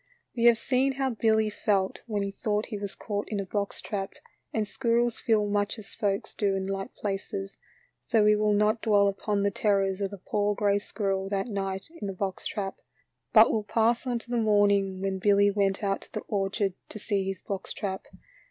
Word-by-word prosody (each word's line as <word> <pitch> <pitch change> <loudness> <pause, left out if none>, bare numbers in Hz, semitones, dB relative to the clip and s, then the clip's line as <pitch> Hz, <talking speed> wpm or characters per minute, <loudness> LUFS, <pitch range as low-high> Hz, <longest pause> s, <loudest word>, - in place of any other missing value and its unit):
We 235 -1 +1
have 235 -1 +7
seen 265 +2 +1
how 265 -1 0
Billy 220 -1 +2
felt 195 -2 0
when 210 -3 -1
he 200 - -3
thought 210 +1 -1
he 215 - -5
was 200 -1 -5
caught 205 -2 -4
in 210 - -2
a 195 - -2
box 200 +1 -2
trap, 195 -2 -4 0.4
and 215 -2 -1
squirrels 235 0 +1
feel 215 -2 +2
much 205 +1 0
as 210 -2 -10
folks 200 -1 -1
do 200 -2 +1
in 190 0 -2
like 195 0 -4
places, 195 -1 -4 0.5
so 225 -3 +4
we 210 0 +5
will 210 0 +2
not 210 +2 +2
dwell 205 -2 +4
upon 200 +1 -1
the 200 - +2
terrors 195 -1 +1
of 195 - 0
the 200 - -8
poor 205 +2 0
gray 205 0 +2
squirrel 195 -2 -2
that 195 -1 -1
night 195 -2 -3
in 205 - -2
the 195 - -3
box 190 0 -3
trap, 195 -2 -4 0.5
but 220 0 +7
will 215 - 0
pass 230 +4 +1
on 245 -1 0
to 235 +1 -10
the 240 - +1
morning 200 -3 +3
when 190 -1 -1
Billy 200 +1 +4
went 200 0 0
out 195 -1 0
to - - -16
the - - -3
orchard 195 -1 -1 0.2
to - - -7
see 200 -2 -1
his 190 -1 -4
box 195 -2 -5
trap. 190 -2 -4
205 Hz, 205 wpm, -28 LUFS, 195-215 Hz, 0.5 s, have